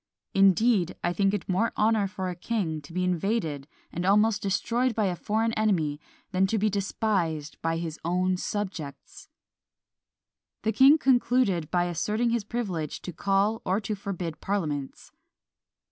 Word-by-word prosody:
Indeed, 195 -1 +4
I 175 - +1
think 195 +1 +2
it 205 - -3
more 190 +5 +1
honour 215 -1 +3
for 190 -1 -4
a 180 - -3
king 175 -5 -2
to 145 - -14
be 180 +2 -1
invaded 175 -5 -1 0.2
and 175 - -3
almost 210 +3 +3
destroyed 230 +5 0
by 215 - +1
a 185 -2 0
foreign 220 +5 0
enemy 165 -10 0 0.3
than 190 0 +2
to 220 - 0
be 215 0 +1
despised 190 -6 -1
by 165 0 0
his 165 -2 -5
own 180 +2 +1
subjects. 180 -9 -5 1.3
The 220 - +1
king 275 +6 +7
concluded 245 - +2
by 175 0 +2
asserting 210 +7 0
his 235 -2 0
privilege 195 -9 -4
to 180 - -6
call 200 +5 +1
or 190 +3 +1
to 215 +1 -3
forbid 185 -5 -5
parliaments. 150 -9 -3
195 Hz, 150 wpm, -27 LUFS, 170-215 Hz, 1.3 s, king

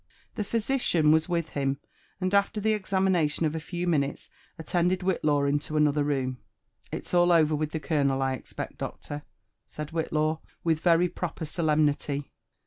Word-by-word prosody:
The 215 - -2
physician 210 - +2
was 160 +2 +3
with 170 -2 0
him, 135 -1 -1 0.4
and 185 0 -1
after 200 +2 +2
thQ 215 +1 +2
examioatiop 185 -5 +1
of 155 - 0
a - - -1
few 175 +2 -4
minutes, 145 -5 -1 0.3
attended 175 +3 0
Whitlaw 155 -6 +1
into 145 +2 -1
another 150 -1 +3
room. 130 -3 -1 0.5
It's - - -6
all 175 0 +5
over 155 -2 +4
with 155 0 0
the 160 - -3
colonel, 140 -3 +1
I 135 0 +1
expect, 130 - -7
doctor 145 0 -5 0.3
?" - - -52
said 150 +1 -7
Whitlaw 155 -1 0 0.2
with 160 -2 +2
very 170 +1 +4
proper 170 -1 -4
solemnity. 150 -3 0
160 Hz, 160 wpm, -27 LUFS, 150-175 Hz, 0.5 s, all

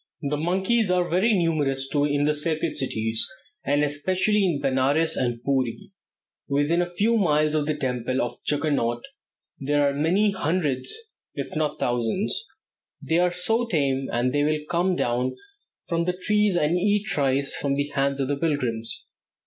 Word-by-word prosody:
The 145 +1 0
monkeys 190 +7 +1
are 180 -1 +2
very 185 +7 +2
numerous 150 -7 0
in 145 0 +2
the 150 - +2
sacred 155 +1 -1
cities, 110 -3 -1 0.4
and 145 +1 +2
especially 185 +8 +1
in 170 -7 +1
Benares 140 +4 +1
and 120 -2 -2
Pooree. 135 - -1 0.6
Within 145 +5 +2
a 175 - -2
few 210 +6 +1
miles 155 -6 +2
of 150 -1 0
the 155 - 0
temple 130 -1 -1
of 120 0 -3
Juggernaut 140 -6 0 0.6
there 145 +1 +2
are 140 - 0
many 180 +9 +2
hundreds, 150 -8 -1 0.4
if - - -5
not 155 -1 -1
thousands. 120 - 0 0.5
They 165 +1 0
are 180 0 +3
so 225 +7 0
tame 135 -7 0
that 120 +2 0
they 145 +1 +1
will 150 0 0
come 180 +2 +1
down 125 -3 0 0.5
from 170 -1 0
the 180 0 -1
trees 210 0 +2
and 170 +1 +2
eat 205 +2 +1
rice 140 -1 +1
from 140 -1 0
the 145 +1 -1
hands 140 -1 0
of 135 - 0
the 145 0 -1
pilgrims. 125 -8 -1
150 Hz, 160 wpm, -25 LUFS, 135-175 Hz, 0.6 s, are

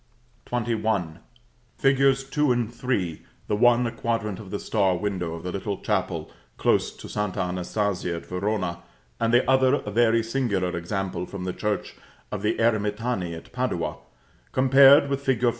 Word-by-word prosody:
XXI. 110 -8 -1 0.6
Figs. 135 0 +3
2 140 +1 +1
and 120 -2 0
3, 100 -12 -2 0.2
the 105 - 0
one 120 +2 +4
a 115 - -1
quadrant 115 -4 -2
of 105 -4 -10
the 100 - -3
star 95 -4 +1
window 90 -4 -2
of 80 - -9
the 90 - -3
little 100 +1 -3
chapel - - -2 0.3
close - - +2
to - - -11
St. 105 -2 -3
Anastasia 90 0 -1
at 85 - -7
Verona, 90 -2 -2 0.4
and 115 0 +1
the 120 +1 +4
other 130 0 +4
a 105 - -4
very 115 +1 +3
singular 110 -7 -1
example 90 +1 -3
from 100 -2 -6
the 90 0 -3
church 105 -1 -3 0.4
of - - -3
the - - +1
Eremitani 105 -4 0
at - - -13
Padua, - - -2 0.5
compared 135 +2 +7
with 140 0 -2
fig. 130 -3 +1
105 Hz, 160 wpm, -25 LUFS, 95-125 Hz, 0.6 s, compared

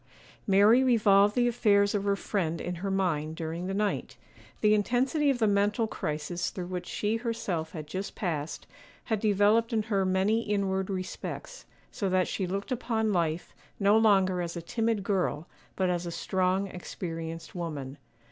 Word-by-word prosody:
MARY 210 +6 +6
revolved 210 -5 +4
the 245 -1 +3
affairs 200 -4 +3
of 200 -1 -1
her 200 0 +2
friend 175 -5 -2
in 180 - -3
her 200 - -2
mind 165 -5 0
during 165 +2 -4
the 195 - -2
night. 210 0 -1 0.4
The 210 0 +5
intensity 255 +8 +2
of 270 - +2
the 225 - +2
mental 205 +2 +2
crisis 175 -3 -3
through 180 - -6
which 180 0 -5
she 215 +2 -1
herself 205 -9 -3
had 155 -4 -6
just 190 +6 -5
passed, 160 -5 -3 0.4
had 220 -3 -1
developed 210 +2 +3
her 215 -2 +1
in 185 -1 +1
many 200 +4 +2
inward 195 -3 -1
respects, 195 - -5 0.3
so 200 -4 -2
that 185 -1 +2
she 190 - -2
looked 200 +7 -4
upon 225 -3 0
life 165 -1 -1 0.3
no 200 +1 +4
longer 195 -5 +4
as 170 0 -4
a - - -4
timid 225 +1 -1
girl, 180 -6 -1 0.3
but 185 -1 +1
as 175 0 -2
a - - -4
strong, 185 +2 0
experienced 165 -3 -6
woman. 150 -6 -5
195 Hz, 165 wpm, -29 LUFS, 175-215 Hz, 0.4 s, MARY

